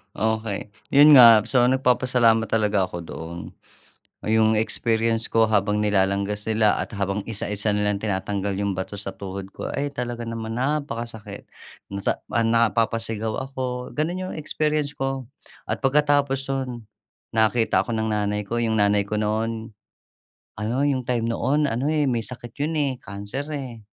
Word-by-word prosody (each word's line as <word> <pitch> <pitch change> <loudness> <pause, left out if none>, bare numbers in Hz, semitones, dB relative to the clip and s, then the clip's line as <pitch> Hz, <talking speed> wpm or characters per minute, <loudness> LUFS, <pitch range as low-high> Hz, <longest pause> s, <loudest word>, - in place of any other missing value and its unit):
Okey, 110 -2 -2 0.2
'yon 145 +2 +9
nga 115 -4 +9
so 125 0 +3
nagpapasalamat 125 -3 +3
talaga 105 -4 +1
ako 90 - -7
doon. 80 +1 -7 0.9
'Yong 110 0 +3
experience 115 0 0
ko 115 0 +4
habang 105 -1 +1
nilalanggas 100 0 0
nila 110 -1 +3
at - - -4
habang 100 0 -1
isa-isa 105 -1 -2
nilang 105 -1 0
tinatanggal 100 -1 -2
'yong 100 -1 -1
bato 95 +2 -5
sa 100 - -4
tuhod 95 0 -7
ko - - -5
ay 145 +1 -2
talaga 120 -2 -4
naman 115 -1 -4
napakasakit. 120 -6 -3 0.4
Nata 100 0 -2
napapasigaw 115 -1 +1 0.2
ako, 125 -2 -4
gano'n 165 +5 -1
'yong - - -6
experience 150 -1 -1
ko 135 -1 -3 0.4
at - - -1
pagkatapos 140 -1 +2
no'n 135 -1 -2 0.6
nakita 110 +1 +3
ako - - -8
ng 110 0 -1
nanay 105 -1 0
ko, 115 +4 -2
'yong 110 -1 +1
nanay 105 0 +3
ko 105 +1 -2
noon 110 +1 -2 0.8
ano 120 +6 -1
yung 135 -3 0
time 120 -2 -1
noon, 135 +6 +1
ano, 130 +4 -1
eh, 150 -2 +1
may 120 -3 0
sakit 120 0 -9
yun, 155 +1 -1
eh, 140 -3 +1
cancer, 100 +7 -6
eh. 130 -6 -6
115 Hz, 150 wpm, -24 LUFS, 105-130 Hz, 0.9 s, yon